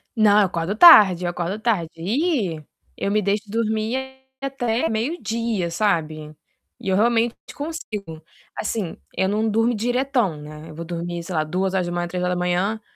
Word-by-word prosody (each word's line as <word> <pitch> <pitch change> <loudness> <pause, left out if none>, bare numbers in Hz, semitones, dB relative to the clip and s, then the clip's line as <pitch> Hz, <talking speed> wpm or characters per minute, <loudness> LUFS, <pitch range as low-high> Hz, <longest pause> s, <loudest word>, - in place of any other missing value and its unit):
Não, 210 -2 +5
eu - - +4
acordo 175 +2 -2
tarde. 205 - +8
Eu - - 0
acordo 175 +3 -3
tarde. 210 -8 0
Ih, 205 - -1 0.3
eu 200 - -1
me 210 +1 +2
deixo 205 +1 0
dormir 220 +2 -1 0.4
até 245 -4 -1
meio-dia, 225 - -2
sabe. 155 -6 -1 0.5
E 235 - -9
eu 190 - +2
realmente 235 +1 +2 0.2
consigo. 215 - -6 0.4
Assim, 210 -5 -3 0.2
eu 190 - +1
não 215 +2 0
durmo 225 +3 +2
diretão, 245 - 0
né. 150 +1 -10
Eu 155 - -11
vou 165 - -6
dormir, 170 0 -4
sei 180 - -7
lá, 155 - +2
2h, 175 +1 -1
3h. 180 +4 -1
200 Hz, 150 wpm, -22 LUFS, 175-225 Hz, 0.5 s, tarde